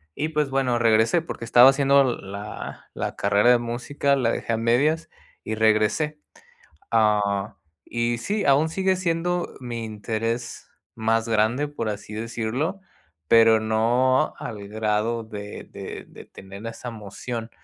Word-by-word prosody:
y, 155 +3 -2
pues 150 -3 0
bueno, 130 -3 +1
regresé 115 +8 +3
porque 115 - -6
estaba 120 +3 +8
haciendo 140 0 +4
la 100 -4 -6
la - - -4
carrera 100 +4 +3
de 120 - +6
música. 120 +4 -1
La 125 -4 +1
dejé 115 - -2
a - - +1
medias 150 +8 +1 0.3
y 110 - -3
regresé. 110 +8 +2 0.7
Ah, 105 -2 +2 0.3
y 120 0 -1
sí, 205 - -2
aún 140 +3 +4
sigue 190 +3 +1
siendo 175 0 -1
mi 120 -2 -5
interés 115 +2 -4 0.3
más 115 +1 0
grande, 115 +7 +2
por 115 -7 -4
así 105 0 -6
decirlo. 115 - -3 0.5
Pero 115 -1 +6
no 120 +6 +2
al 100 -2 -7
grado 110 +2 -1
de 105 -1 -8
de, - - -7
de - - -13
tener 100 +3 -11
esa 115 +2 -7
emoción. 115 +2 -6
115 Hz, 140 wpm, -24 LUFS, 110-135 Hz, 0.7 s, estaba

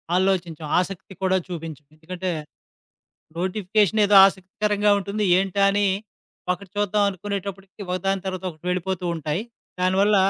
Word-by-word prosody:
ఆలోచించం. 175 -4 0
ఆసక్తి 190 +1 -5
కూడా 190 0 +3
చూపించం. 160 -5 -7
ఎందుకంటే 180 +3 -4 1.1
నోటిఫికేషన్ 205 +3 +1
ఏదో 205 - +5
ఆసక్తికరంగా 205 +2 0
ఉంటుంది. 200 +2 -2
ఏంటా? 195 +1 0
అని 205 0 +2 0.7
ఒకటి 185 +1 -8
చూద్దాం 205 0 +2
అనుకునేటప్పడికి 195 +1 -6
ఒకదాని 195 +1 -1
తర్వాత 185 -1 -4
ఒకటి 155 0 -18
వెళ్ళిపోతూ 180 0 -2
ఉంటాయి. 155 +3 -2 0.4
దానివల్ల 195 +3 +3
190 Hz, 115 wpm, -23 LUFS, 180-200 Hz, 1.1 s, ఏదో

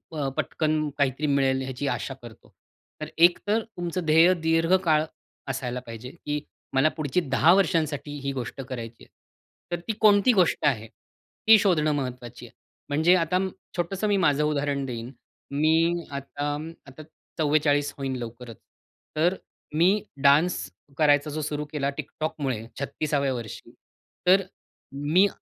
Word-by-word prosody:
अ, 145 -3 -1
पटकन 155 -1 0
काहीतरी 140 +1 0
मिळेल 135 -2 +2
ह्याची 130 +1 -4
आशा 135 - -2
करतो. 120 -2 -14 0.5
तर 155 - -3
एक 175 +2 +6
तर 215 +2 +2
तुमचं 180 -5 -4
ध्येय 165 +4 +6
दीर्घकाळ 165 0 +3 0.5
असायला 125 -1 -3
पाहिजे, 115 +2 -8
की 150 -2 -4 0.3
मला 135 +3 +4
पुढची 155 +3 0
10 150 +3 +4
वर्षांसाठी 160 -6 +1
ही 140 - -1
गोष्ट 130 +1 -5
करायची 115 -3 -7
आहे. - - -18 0.7
तर - - -7
ती 225 - 0
कोणती 205 +2 +6
गोष्ट 185 -5 +2
आहे? 115 -6 +1 0.6
ती 220 0 +9
शोधणं 170 -6 +2
महत्त्वाची 125 -3 -5
आहे. 120 - -15 0.4
म्हणजे 160 +5 +4
आता 170 0 0
अं, 190 +1 +1 0.3
छोटंसं 185 +4 -1
मी 205 -1 +2
माझं 150 -5 +2
उदाहरण 145 -2 0
देईन. 120 -1 -6 0.4
मी 165 +4 +2
आता 145 +1 -4
अं, 155 +2 -6 0.2
आता 135 +3 -11 0.3
44 145 -1 +2
होईन 135 -2 -3
लवकरच. 120 -1 -8 0.6
तर 170 +4 +2 0.4
मी 190 +6 +3 0.2
डान्स 140 - +3 0.3
करायचा 145 -1 +3
जो 155 +1 -3
सुरु 150 0 -3
केला 140 -2 -1
TikTokमुळे 135 -7 -3
36 140 -1 -1
वर्षी. 115 -4 -7 0.6
तर 190 +2 +6 0.7
मी 190 +3 +6
150 Hz, 140 wpm, -26 LUFS, 135-170 Hz, 0.7 s, ती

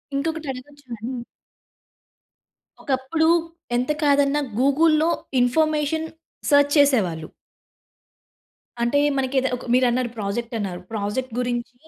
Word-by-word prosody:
ఇంకొకటి 315 +1 -2
అడగొచ్చా 285 +2 -12
అండి? 240 +2 -5 1.6
ఒకప్పుడు 275 +4 0 0.5
ఎంత 250 +4 0
కాదన్నా 285 0 +3 0.2
గూగుల్‌లో 310 +4 +3 0.3
ఇన్ఫర్మేషన్ 310 +4 +1 0.4
సెర్చ్ 285 0 +5
చేసేవాళ్ళు. 200 - +2 1.5
అంటే 240 +5 +2 0.2
మనకి 265 0 -1
ఏద 265 - 0
ఒక - - -11
మీరన్నారు 250 -1 +2
ప్రాజెక్ట్ 220 +3 -3
అన్నారు 185 -3 -4
ప్రాజెక్ట్ 220 +3 -3
గురించి 245 0 -2
265 Hz, 95 wpm, -23 LUFS, 240-290 Hz, 1.6 s, సెర్చ్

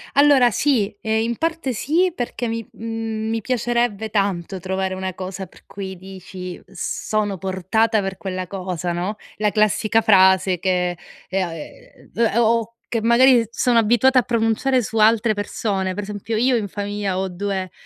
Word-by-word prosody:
Allora, 280 -4 +6
sì, 225 -6 +1
ehm, 220 0 0
in 235 0 -2
parte 325 -5 -1
sì, 330 - +1
perché 245 -3 -3
mi 230 0 -4
mhmm, 225 -1 -4
mi 225 0 0
piacerebbe 235 -2 -1
tanto 195 -3 -1
trovare 190 +1 -2
una 185 0 -4
cosa 190 +1 -6
per - - -20
cui 190 -1 -7
dici: 185 -1 -9
"Sono 210 -3 -2
portata 195 +4 +1
per 195 -1 -4
quella 185 -1 -4
cosa," 180 -2 -4
no, 180 +5 -2 0.2
la 210 -1 +1
classica 215 +1 +2
frase 190 -3 +4
che, 180 -2 0 0.3
ehm, 190 -1 0
a 165 - -7
ehm, 150 - -12
d - - -22 0.2
o 235 - +4
o 230 0 +1 0.2
che 230 -2 0
magari 235 0 +5
sono 240 0 +2
abituata 240 +4 +4
a - - +3
pronunciare 235 +2 +1
su 225 +2 -4
altre 220 +1 +4
persone, 200 -2 -2
per 205 - -4
esempio: 210 +2 -4
io 245 +2 +3
in 205 -2 -2
famiglia 205 -1 -3
ho 190 0 -1
2 190 0 -3
210 Hz, 170 wpm, -21 LUFS, 190-230 Hz, 0.3 s, Allora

